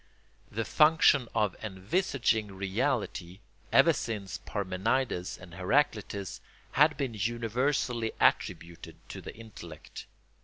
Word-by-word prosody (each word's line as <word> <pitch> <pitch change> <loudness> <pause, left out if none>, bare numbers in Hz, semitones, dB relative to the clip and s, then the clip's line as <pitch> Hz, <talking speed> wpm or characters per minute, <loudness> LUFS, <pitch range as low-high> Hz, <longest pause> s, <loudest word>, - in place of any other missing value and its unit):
The 115 +1 -3
function 150 -5 +5
of 105 -4 +1
envisaging 110 - 0
reality, 95 -2 -2 0.3
ever 165 - +6
since 110 -7 -4
Parmenides 100 +1 -1
and 90 -2 -13
Heraclitus, 100 - 0 0.3
had 150 +3 +4
been 135 -5 -2
universally 120 +2 0
attributed 85 0 0
to - - -7
the - - -9
intellect. 95 -9 -10
110 Hz, 100 wpm, -30 LUFS, 95-130 Hz, 0.3 s, ever